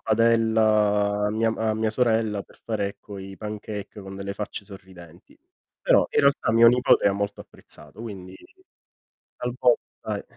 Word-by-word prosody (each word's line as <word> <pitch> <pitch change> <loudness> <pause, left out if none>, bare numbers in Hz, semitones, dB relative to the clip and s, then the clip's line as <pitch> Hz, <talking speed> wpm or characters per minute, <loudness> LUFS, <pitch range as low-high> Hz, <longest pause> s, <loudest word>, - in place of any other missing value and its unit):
padella 110 -2 +2
a - - 0
mia 115 +1 +1
ma 110 0 -2
a - - 0
mia 110 0 0
sorella 110 -3 +1
per - - -22
fare, 105 -3 -1
ecco, 100 0 -11
i 95 0 -9
pancake 105 0 -7
con 95 0 -9
delle 100 0 -5
facce 105 0 -6
sorridenti. 95 -4 -15 0.4
Però, - - +4
in - - +2
realtà 140 -4 +2
mio 115 +1 +6
nipote 125 -1 +4
ha 100 - +4
molto 100 +1 -3
apprezzato, 75 +7 -13
quindi 95 -5 -8 1.0
talvolta 125 0 -1
105 Hz, 150 wpm, -24 LUFS, 100-115 Hz, 1.0 s, mio